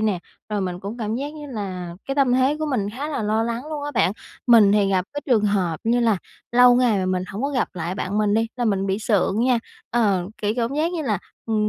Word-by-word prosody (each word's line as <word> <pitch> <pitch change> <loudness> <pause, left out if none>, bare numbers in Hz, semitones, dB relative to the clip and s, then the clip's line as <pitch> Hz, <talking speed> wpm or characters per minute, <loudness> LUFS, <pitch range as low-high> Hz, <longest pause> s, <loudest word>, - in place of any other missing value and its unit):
nè, 215 -4 +1 0.3
rồi 210 -1 -1
mình 180 -2 -3
cũng 205 +5 -6
cảm 215 -1 -2
giác 285 +5 -4
như 300 -1 -8
là 185 -8 -5
cái 275 - -1
tâm 275 -3 +3
thế 260 +4 +3
của 310 - -2
mình 215 -8 -1
khá 275 +7 -5
là 290 -7 -2
lo 215 +1 +1
lắng 235 +1 -2
luôn 300 -2 -4
á 290 - -3
bạn. 190 - +3 0.3
Mình 225 -5 +7
thì 205 -1 +3
gặp 185 -1 +2
cái 290 - -4
trường 235 -6 +3
hợp 190 -5 +1
như 235 +2 +2
là 225 -5 +2 0.3
lâu 245 0 +7
ngày 245 -5 +3
mà 185 - -1
mình 185 0 0
hổng 205 +5 -5
có 280 - +1
gặp 255 -4 0
lại 170 +1 -4
bạn 195 +1 -2
mình 210 -1 +2
đi 225 +1 +2
là 245 - -1
mình 195 -3 +1
bị 195 +1 0
sượng 210 -1 +1
nha, 250 -2 +3 0.3
ờ, 200 -6 +1
kiểu 210 0 +1
cảm 240 +2 -1
giác 320 +4 0
như 330 -3 -2
là, 215 -8 0 0.3
ừm, 215 -2 +1
220 Hz, 260 wpm, -23 LUFS, 200-250 Hz, 0.3 s, Mình